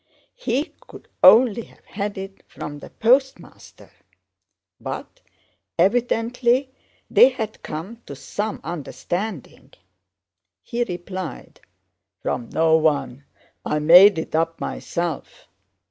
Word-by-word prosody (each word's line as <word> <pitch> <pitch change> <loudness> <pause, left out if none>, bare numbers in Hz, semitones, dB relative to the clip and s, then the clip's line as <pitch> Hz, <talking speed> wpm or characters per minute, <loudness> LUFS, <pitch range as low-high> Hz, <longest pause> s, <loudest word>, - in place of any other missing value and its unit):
He 330 - -2
could - - -13
only 235 -1 +7
have - - -23
had 205 0 -5
it 195 0 -8
from 145 0 -8
the - - -11
Postmaster. 265 +4 -1 0.9
But - - -7 0.6
evidently 240 +6 +1 0.4
they 255 - +7
had 220 -5 -6
come 170 +10 -7
to 140 - -7
some 205 +10 -4
understanding. 175 - -5 0.9
He 240 - -2
replied: 180 -1 -7 0.6
'From 120 - -3
no 160 0 +3
one; 145 -4 0 0.4
I - - -1
made 175 +5 +7
it 160 - -5
up 165 +1 0
myself. 170 -4 -5
195 Hz, 100 wpm, -22 LUFS, 160-235 Hz, 0.9 s, only